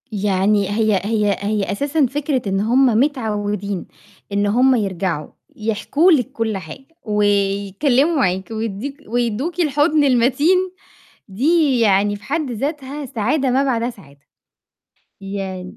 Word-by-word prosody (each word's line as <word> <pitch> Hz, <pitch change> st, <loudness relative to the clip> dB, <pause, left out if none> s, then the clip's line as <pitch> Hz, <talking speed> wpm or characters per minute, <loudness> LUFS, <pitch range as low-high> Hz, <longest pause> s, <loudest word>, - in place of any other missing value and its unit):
يعني 200 Hz, -1 st, +1 dB
هي 210 Hz, -2 st, +1 dB
هي 210 Hz, -2 st, +1 dB
هي 205 Hz, 0 st, -1 dB
أساسًا 285 Hz, +7 st, +1 dB
فكرة 280 Hz, 0 st, -1 dB
إن 195 Hz, 0 st, 0 dB
هُم 245 Hz, +6 st, +3 dB
متعوّدين 210 Hz, -6 st, -1 dB, 0.5 s
إن 205 Hz, 0 st, +1 dB
هُم 255 Hz, +5 st, +4 dB
يرجعوا 185 Hz, -7 st, -2 dB, 0.3 s
يحكوا 225 Hz, -, +1 dB
لِك 260 Hz, -8 st, +2 dB
كلّ 220 Hz, -3 st, -2 dB
حاجة، 185 Hz, +9 st, -10 dB, 0.2 s
ويتكلّموا 205 Hz, -, +1 dB
معاكِ 190 Hz, -6 st, 0 dB
ويدّيك 225 Hz, +5 st, -4 dB
ويدّوكِ 245 Hz, +9 st, -2 dB
الحضن 300 Hz, -1 st, +2 dB
المتين، 270 Hz, +7 st, +3 dB, 0.7 s
دي 275 Hz, -, +2 dB
يعني 205 Hz, -2 st, +3 dB
في 205 Hz, -, -13 dB
حد 295 Hz, -2 st, -2 dB
ذاتها 280 Hz, +3 st, -4 dB
سعادة 260 Hz, +4 st, 0 dB
ما 265 Hz, +2 st, +2 dB
بعدها 240 Hz, -3 st, 0 dB
سعادة. 145 Hz, -, -15 dB, 1.0 s
يع 195 Hz, -2 st, -5 dB
225 Hz, 120 wpm, -19 LUFS, 200-275 Hz, 1.0 s, هُم